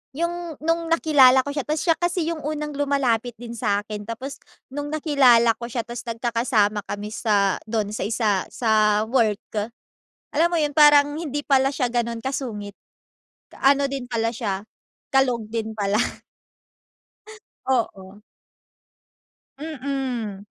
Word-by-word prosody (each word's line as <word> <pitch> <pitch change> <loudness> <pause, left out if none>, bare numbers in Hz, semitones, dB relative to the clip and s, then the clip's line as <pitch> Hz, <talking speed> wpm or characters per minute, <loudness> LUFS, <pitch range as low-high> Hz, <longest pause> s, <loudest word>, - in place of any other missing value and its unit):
Yung 340 0 -3
nung 330 +1 0
nakilala 280 -6 +5
ko 285 - -4
siya 285 -2 -4
tas 305 0 -1
siya 345 - +3
kasi 345 -1 0
yung 330 - -4
unang 300 0 -4
lumalapit 270 -5 0
din 235 +1 -9
sa'kin 210 -2 -2
tapos 255 +5 -6 0.3
nung 290 +1 -4
nakilala 280 -6 +4
ko 235 - -5
siya 235 -1 -3
tas 240 +1 -7
nagkakasama 230 -2 +1
kami 205 +1 -5
sa 205 -4 +1
dun 215 -2 -1
sa 210 -2 -3
isa 210 -4 0
sa 215 -2 +2
work. 220 -2 0 0.7
Alam 340 +3 +3
mo - - +2
yun, 295 -1 0
parang 295 -1 +6
hindi 290 -3 -3
pala 270 -2 +3
siya 250 -3 0
ganun 235 -1 -1
kasungit. 220 -7 -4 0.8
Ano 280 +1 +4
din 270 -2 -4
pala 230 -1 0
siya 200 -5 -3 0.5
kalog 250 -5 +2
din 220 -1 -3
pala. 205 -1 0 1.7
Oo. 205 -5 -2 1.4
Mm. 265 -9 -4
245 Hz, 130 wpm, -23 LUFS, 220-290 Hz, 1.7 s, parang